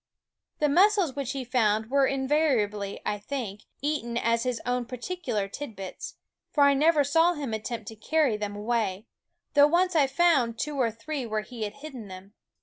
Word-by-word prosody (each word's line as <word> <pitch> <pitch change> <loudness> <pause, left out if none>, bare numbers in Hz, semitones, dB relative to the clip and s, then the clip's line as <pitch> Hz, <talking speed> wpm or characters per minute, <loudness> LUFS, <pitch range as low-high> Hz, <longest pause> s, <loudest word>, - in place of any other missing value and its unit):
The 300 - +2
mussels 370 0 +4
which 275 -2 -3
he 270 -2 -4
found 220 -2 +1
were 275 -1 +4
invari 275 -2 +2
ably, 205 -1 -5
I 210 - -1
think, 210 -4 -5 0.2
eaten 285 -6 -1
as 230 0 +1
his 250 -1 -1
own 245 0 0
particular 250 - -3
tid 230 +2 -7
bits; 190 -1 -7 0.3
for 290 - +3
I 280 0 +6
never 300 +2 +4
saw 325 +5 +3
him 280 -7 -4
attempt 220 0 -4
to 225 - -10
carry 275 +2 +1
them 210 -1 -4
away, 210 -2 -1 0.5
though 290 0 +7
once 355 +3 +2
I 290 -4 +5
found 270 -6 +2
two 295 +4 -3
or 235 - +3
three 250 +4 -5
where 215 -1 -2
he 230 -1 -5
had 205 - -6
hidden 260 -9 -8
them. 190 +1 -11
250 Hz, 185 wpm, -27 LUFS, 215-290 Hz, 0.5 s, though